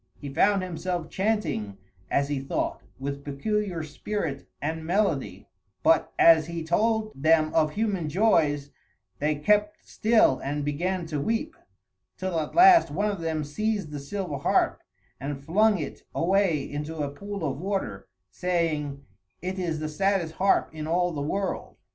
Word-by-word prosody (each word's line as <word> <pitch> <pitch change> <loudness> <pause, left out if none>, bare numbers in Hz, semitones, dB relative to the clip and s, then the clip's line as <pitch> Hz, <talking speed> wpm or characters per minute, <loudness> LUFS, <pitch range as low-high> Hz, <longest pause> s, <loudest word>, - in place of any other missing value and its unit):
He 140 -2 -8
found 200 +2 +3
himself 180 -1 -3
chanting, 190 - -1 0.3
as 140 0 +1
he 145 -1 -1
thought, 135 - -2 0.2
with 140 +1 -5
peculiar 175 +4 -2
spirit 155 -1 -4
and 160 +2 -3
melody, 160 - 0 0.4
but 165 -2 +4
as 160 -2 +6
he 170 -1 -4
told 215 +6 +1
them 155 +2 +3
of 155 -1 +2
human 200 -7 -1
joys 150 -6 +2 0.5
they 150 +1 +1
kept 210 +7 +1
still 215 - +3
and 145 +1 -3
began 175 +5 -1
to 155 -3 -3
weep, 230 - -1 0.6
till 185 -3 -1
at 155 - -4
last 355 -1 +8
one 205 +7 0
of 195 -4 -5
them 160 -2 -1
seized 200 +3 -2
the 145 - -5
silver 165 +1 -4
harp - - +1 0.4
and 140 0 -5
flung 210 +5 +4
it 150 -5 -6
away 175 -4 +2
into 150 +3 -5
a 140 - -3
pool 200 +5 -6
of 135 -1 -2
water, 180 - -3 0.2
saying, 155 -6 -1 0.3
"It 185 +1 -4
is 165 -4 -2
the 155 - -3
saddest 180 0 0
harp 195 +4 +2
in 155 -1 -5
all 175 +2 +1
the 150 -3 -4
world." 190 +7 -3
165 Hz, 155 wpm, -26 LUFS, 145-200 Hz, 0.6 s, last